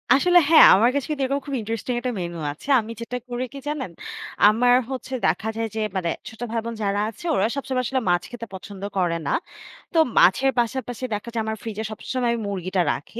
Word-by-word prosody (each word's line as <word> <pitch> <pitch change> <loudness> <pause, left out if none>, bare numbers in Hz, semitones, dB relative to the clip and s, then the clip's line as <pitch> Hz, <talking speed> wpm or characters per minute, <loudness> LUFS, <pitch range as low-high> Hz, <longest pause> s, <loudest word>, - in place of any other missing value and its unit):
আসলে 355 +5 +5
হ্যাঁ 325 - +9
আমার 225 +5 +4
কাছে 285 -2 -1
কিন্তু 295 -3 -1
এরকম 275 +2 0
খুব 280 -2 -3
ইন্টারেস্টিং 225 +3 -3
একটা 250 0 -2
মেনু 170 -1 -4 0.2
আছে। 150 - -15
আমি 225 0 -6
যেটা 250 +2 -4
করি 245 +1 -2
কি 280 - -7
জানেন? 290 - -3 0.6
আমার 245 +3 +4
হচ্ছে 265 0 -5
দেখা 220 - +1
যায় 225 0 -1
যে, 220 - -1
মানে 180 -3 0 0.2
ছোট-ভাইবোন 230 0 -4
যারা 200 0 0
আছে 225 - -12
ওরা 195 - +2
সবসময় 265 -2 -2
আসলে 260 +2 0
মাছ 175 0 +3
খেতে 235 -1 -6
পছন্দ 190 +1 -9 0.2
করে 175 -3 +1
না। - - 0 0.6
তো - - 0 0.2
মাছের 265 +9 +5
পাশাপাশি 245 0 -2
দেখা 210 +3 -4
যায় 230 - 0
আমার 220 0 -3
ফ্রিজে 220 -1 -4
সবসময় 245 +3 -2
আমি 235 - -1
মুরগিটা 185 -1 -1
রাখি। 225 +10 -8
230 Hz, 200 wpm, -23 LUFS, 205-260 Hz, 0.6 s, হ্যাঁ